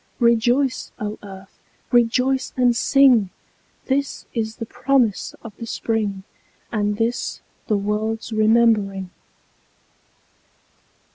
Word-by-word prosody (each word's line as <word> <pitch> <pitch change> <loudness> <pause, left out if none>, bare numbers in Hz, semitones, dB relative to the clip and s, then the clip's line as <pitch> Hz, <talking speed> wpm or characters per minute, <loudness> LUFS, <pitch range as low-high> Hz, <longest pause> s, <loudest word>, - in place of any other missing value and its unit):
Rejoice, 240 +3 +2
O 210 0 -4
Earth! 195 -1 -12 0.3
Rejoice 250 +2 +2
and 245 -2 +3
sing! 255 -6 +4 0.6
This 275 +1 -1
is 220 -2 -2
the 230 - -6
promise 250 -3 0
of 215 -3 -10
the 230 - -7
Spring, 215 -4 -2 0.5
And 210 -2 0
this 230 +2 -1 0.3
the 215 - +2
world's 215 +3 -2
remembering. 215 -4 +2
225 Hz, 95 wpm, -21 LUFS, 210-245 Hz, 0.6 s, sing